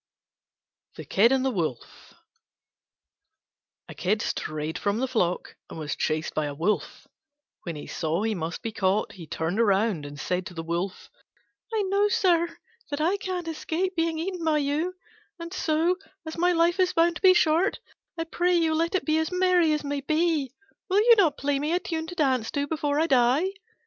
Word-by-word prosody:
THE - - -8
KID 225 +5 +4
AND 265 0 +2
THE 265 - +2
WOLF 160 - -5 1.7
A - - -9
Kid 205 +4 0
strayed 155 +2 -3
from 205 +1 0
the 260 +3 0
flock 180 -8 -1
and - - -8
was 150 -2 -3
chased 155 0 -1
by 155 -1 -1
a 145 - -5
Wolf. 175 +8 -2 0.6
When 170 -3 -4
he 150 - -7
saw 165 +4 -2
he 225 0 0
must 170 0 -4
be 225 - -3
caught 195 0 0
he 170 -4 -11
turned 160 +7 -2
round 195 -7 +1
and 145 0 -10
said 180 +2 -2
to 180 - -11
the 165 - -4
Wolf, 170 +3 -4 0.6
"I 440 -2 0
know, 400 +2 +2
sir, 345 -4 +2 0.3
that 285 0 -3
I 345 +6 +2
can't 365 -3 -4
escape 335 +3 -2
being 330 -1 0
eaten 355 +1 -3
by 315 -1 +2
you: 300 +5 -1 0.4
and 335 +1 -8
so, 335 0 +1 0.3
as 315 - -6
my 355 +1 +2
life 345 +2 +2
is 365 -1 +3
bound 335 0 +3
to - - -15
be 370 -1 +7
short, 340 +5 +2 0.4
I 330 - -1
pray 350 +2 +1
you 325 -2 +2
let 330 +3 0
it 375 - 0
be 310 0 +2
as 320 +1 -1
merry 360 -3 +3
as 300 -1 0
may 285 0 -3
be. 310 -2 +1 0.4
Will 380 - +2
you 470 +1 +7
not 335 -9 +3
play 280 0 0
me 300 +3 -1
a 355 - +2
tune 325 -3 -4
to 355 - -8
dance 260 -8 +1
to 285 -1 -1
before 295 -1 -1
I 320 - +3
die?" 265 +4 +3
305 Hz, 195 wpm, -26 LUFS, -, 1.7 s, be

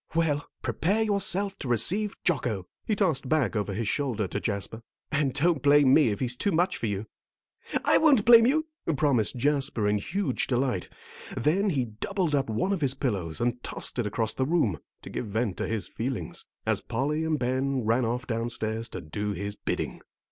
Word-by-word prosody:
"Well, 150 -3 +1 0.2
prepare 205 +7 +1
yourself 200 -1 +1
to 140 - -5
receive 195 - +2
Jocko," 120 - 0 0.2
he 215 - +2
tossed 160 -10 +1
back 155 -7 +1
over 105 -1 -1
his 110 +1 -2
shoulder 120 -6 -1
to - - -2
Jasper; 105 +2 -2 0.3
"and 145 -3 +1
don't 150 +2 +1
blame 145 -1 +5
me 150 -6 +5
if 100 - -2
he's 125 -1 +1
too 200 +10 0
much 175 +3 +1
for 115 - -2
you." 100 +1 -3 0.8
"I - - +5
won't 280 -9 +4
blame 230 0 +8
you," 315 +4 +2 0.3
promised 130 -8 +2
Jasper, 135 -5 +1
in 105 0 +2
huge 160 - -2
delight; 125 -7 0 0.5
then 185 - +2
he 135 -8 0
doubled 160 - -2
up 140 -4 +1
one 115 - 0
of 185 - -2
his 135 -2 +1
pillows 100 - -2
and 120 +1 -1
tossed - - 0
it 115 - 0
across 110 +1 -1
the 130 - -1
room, 125 - +1 0.2
to - - -9
give 120 - -4
vent 105 -1 -1
to - - -2
his 110 -4 -3
feelings, 125 +1 -4 0.2
as - - +1
Polly 150 +4 -1
and 160 -1 0
Ben 130 0 0
ran 115 +3 +2
off 120 +3 -2
downstairs 115 -1 -2
to - - -6
do 105 +7 -3
his 100 +2 -4
bidding. - - -3
130 Hz, 190 wpm, -27 LUFS, 110-160 Hz, 0.8 s, blame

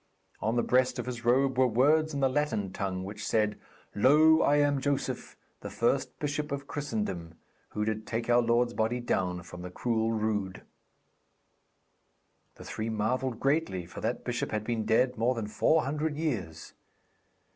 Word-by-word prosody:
On 110 +2 0
the 120 - +2
breast 130 0 +2
of - - -3
his 120 -1 -5
robe 130 +2 +2
were 130 - +5
words 150 +7 +3
in 140 -2 -3
the 135 - +4
Latin 130 -9 -1
tongue, 95 -1 -3
which 100 +2 -7
said, 105 -1 0 0.3
'Lo, 155 +8 +5
I 145 - +4
am 145 -2 +2
Joseph, 140 0 -2 0.2
the - - -7
first - - 0
bishop 150 +1 -3
of 140 0 -3
Christendom, 105 - -4 0.4
who 105 - -1
did 110 0 -3
take 115 0 -2
our 120 0 +5
Lord's 120 +1 +2
body 115 +2 0
down 90 -7 -1
from 90 +1 -10
the 90 - -6
cruel 115 +3 -1
rood.' 105 -4 -2 1.9
The - - -12
three 110 +1 -4
marvelled 115 +3 -1
greatly, 135 - 0
for 90 - -9
that - - -2
bishop - - -2
had 105 0 -2
been 115 -1 -2
dead 125 +1 +2
more 125 +3 +2
than 115 -2 -3
four 155 +9 +2
hundred 150 +2 -2
years. 105 - -3
120 Hz, 165 wpm, -29 LUFS, 105-140 Hz, 1.9 s, were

